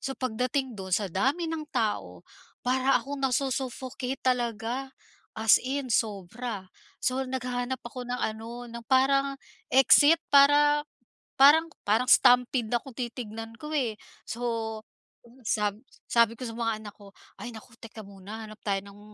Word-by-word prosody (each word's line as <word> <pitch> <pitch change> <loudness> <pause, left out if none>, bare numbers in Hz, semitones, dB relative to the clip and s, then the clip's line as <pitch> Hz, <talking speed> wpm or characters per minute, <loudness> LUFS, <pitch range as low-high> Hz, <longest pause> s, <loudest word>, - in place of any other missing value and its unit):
So, 270 0 -4
pagdating 255 +2 -1
do'n, 190 -1 -1
sa 200 -4 -1
dami 275 - +1
ng 315 -2 -4
tao, 90 - -2 0.5
para 260 +1 +3
akong 275 +3 -6
nasu-suffocate 265 0 -2
talaga, 245 +1 -1 0.5
as 220 -1 +6
in 265 0 -3
sobra. 215 +1 -2 0.4
So, 260 +1 0
naghahanap 250 0 -3
ako 250 +1 -7
ng 250 - -1
ano, 225 +2 -4
ng 235 0 -9
parang 275 +1 +3 0.4
exit 285 +4 +7
para 290 +1 +6 0.6
parang, 305 +4 +7 0.2
parang 220 +5 +2
stampede 245 -1 +5
na 240 - +2
kung 270 - -10
titignan 225 -2 -6
ko, 300 0 -7
eh. 250 -8 0 0.3
So, 225 -2 -3 0.6
sab 210 -2 0 0.3
sabi 235 -1 +4
ko 255 - -4
sa 225 - -7
mga 230 -2 -1
anak 210 -1 -10
ko, 200 -2 -15 0.2
"Ay, 240 - -7
naku. 225 +1 -13
Teka 225 -1 -11
muna, 200 +3 -9
hanap 215 0 -12
tayo 200 -2 0
ng 200 0 -14
245 Hz, 145 wpm, -28 LUFS, 220-265 Hz, 0.6 s, exit